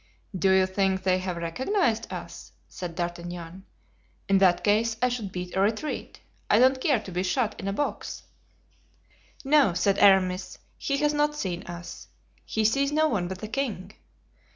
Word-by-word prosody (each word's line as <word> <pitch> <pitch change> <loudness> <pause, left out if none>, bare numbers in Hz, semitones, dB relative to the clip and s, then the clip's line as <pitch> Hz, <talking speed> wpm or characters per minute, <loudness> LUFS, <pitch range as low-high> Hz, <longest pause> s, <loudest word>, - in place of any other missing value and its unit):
"Do 190 +1 +2
you 190 0 +5
think 190 0 0
they 185 -1 +2
have 185 -2 -4
recognized 230 - -1
us?" - - -8
said 175 -2 -7
D'Artagnan. 175 +1 -5 0.6
"In 195 -1 +4
that 180 -2 +4
case 220 +2 +2
I 250 - +2
should 230 -6 -4
beat 180 0 -6
a 190 - +2
retreat. 220 +9 -2 0.3
I 210 - +5
don't 260 +2 +4
care 275 -5 +2
to 200 - -10
be 180 +1 -1
shot 210 +4 -1
in 195 - -5
a 195 - -1
box." 290 +8 -3 1.2
"No," 275 - +4
said 195 +2 +1
Aramis, 190 -2 +3 0.2
"he 280 - -1
has 295 +1 +1
not 295 0 +1
seen 180 -10 -3
us. 170 0 -8 0.4
He 220 -1 -1
sees 275 +6 +2
no 310 +1 +3
one 190 -9 -1
but 185 0 -7
the 215 - -4
king. 215 -6 -3
195 Hz, 170 wpm, -26 LUFS, 185-250 Hz, 1.2 s, you